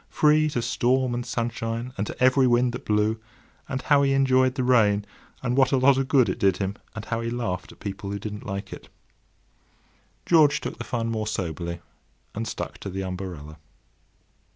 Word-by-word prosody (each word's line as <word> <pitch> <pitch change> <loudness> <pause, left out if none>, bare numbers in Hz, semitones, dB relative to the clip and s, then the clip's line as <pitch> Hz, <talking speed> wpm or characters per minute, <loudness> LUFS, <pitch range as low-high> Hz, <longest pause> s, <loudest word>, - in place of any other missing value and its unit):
—free 155 0 +3
to 120 -5 -2
storm 130 +1 +1
and 120 +1 -3
sunshine, 115 +1 -3
and 100 +1 -2
to - - -7
every 130 0 +5
wind 120 0 +3
that 120 - -7
blew!—and 110 +4 -3
how 145 -1 +4
he 135 -1 +2
enjoyed 130 -1 +3
the 130 - -1
rain, 105 -5 +3 0.4
and 125 0 0
what 130 -1 +4
a 135 - +3
lot 130 +1 +5
of 135 0 -1
good 130 -4 +4
it 95 - -2
did 95 -2 +3
him; 100 +1 -2 0.2
and 110 -1 -6
how 115 0 -2
he 115 - -2
laughed 115 -6 -3
at - - -17
people 100 0 -6
who 100 - -3
didn't 105 +1 -6
like 100 -1 -5
it. - - -11 1.4
George 155 -4 +5
took - - -6
the - - -3
fun 115 -1 -2
more 110 -1 -2
soberly, 85 -3 -4 0.5
and 115 +2 -4
stuck - - -5
to 100 - -6
the 95 +1 -4
umbrella. 90 -5 -6
115 Hz, 190 wpm, -25 LUFS, 100-130 Hz, 1.4 s, every